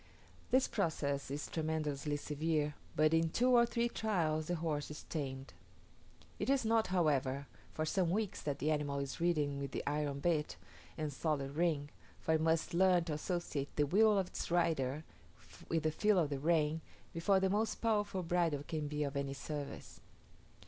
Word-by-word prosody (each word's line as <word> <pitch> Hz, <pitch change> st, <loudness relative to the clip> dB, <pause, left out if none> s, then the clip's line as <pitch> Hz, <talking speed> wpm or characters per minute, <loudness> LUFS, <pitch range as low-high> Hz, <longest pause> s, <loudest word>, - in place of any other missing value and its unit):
This 260 Hz, +1 st, +4 dB
process 145 Hz, -9 st, -1 dB
is 145 Hz, +2 st, -3 dB
tremendously 155 Hz, -2 st, -2 dB
severe, 150 Hz, 0 st, -1 dB, 0.2 s
but 155 Hz, +1 st, +4 dB
in 165 Hz, 0 st, +3 dB
two 250 Hz, +9 st, +2 dB
or 235 Hz, -1 st, +6 dB
three 235 Hz, 0 st, +1 dB
trials 165 Hz, -10 st, 0 dB
the 175 Hz, -, 0 dB
horse 155 Hz, -3 st, -2 dB
is 150 Hz, -, -8 dB
tamed. 135 Hz, -3 st, -5 dB, 0.9 s
It -, -, -1 dB
is 275 Hz, -3 st, +3 dB
not, 225 Hz, 0 st, +3 dB
however, 140 Hz, -6 st, +1 dB, 0.3 s
for 155 Hz, -, -2 dB
some 180 Hz, +2 st, +1 dB
weeks 205 Hz, +2 st, -1 dB
that 145 Hz, -2 st, -2 dB
the 150 Hz, +4 st, 0 dB
animal 145 Hz, -2 st, -1 dB
is 140 Hz, +3 st, -4 dB
ridden 150 Hz, -5 st, +1 dB
with 140 Hz, -1 st, -5 dB
the -, -, -2 dB
iron 145 Hz, -1 st, -1 dB
bit 150 Hz, -, 0 dB, 0.4 s
and 150 Hz, -2 st, -2 dB
solid 140 Hz, -2 st, -1 dB
ring, 150 Hz, -2 st, 0 dB, 0.3 s
for 160 Hz, -, 0 dB
it 160 Hz, -, +2 dB
must 160 Hz, 0 st, +1 dB
learn 180 Hz, 0 st, +4 dB
to 165 Hz, -2 st, -3 dB
associate 150 Hz, -3 st, -3 dB
the 150 Hz, -, +3 dB
will 210 Hz, +7 st, +4 dB
of 195 Hz, -, +2 dB
its 180 Hz, -, -5 dB
rider 155 Hz, -5 st, +1 dB, 0.7 s
with 165 Hz, -2 st, +1 dB
the 155 Hz, -, +2 dB
feel 210 Hz, +5 st, +3 dB
of 155 Hz, -5 st, +2 dB
the 140 Hz, -, -2 dB
rein, 160 Hz, 0 st, +2 dB, 0.3 s
before 190 Hz, +4 st, +3 dB
the 190 Hz, -, +2 dB
most 215 Hz, +2 st, +1 dB
powerful 205 Hz, -4 st, 0 dB
bridle 165 Hz, -4 st, +1 dB
can 155 Hz, -1 st, -3 dB
be 150 Hz, 0 st, -1 dB
of 140 Hz, 0 st, -3 dB
any 140 Hz, -1 st, -1 dB
service. 145 Hz, 0 st, -6 dB
155 Hz, 175 wpm, -35 LUFS, 145-175 Hz, 0.9 s, or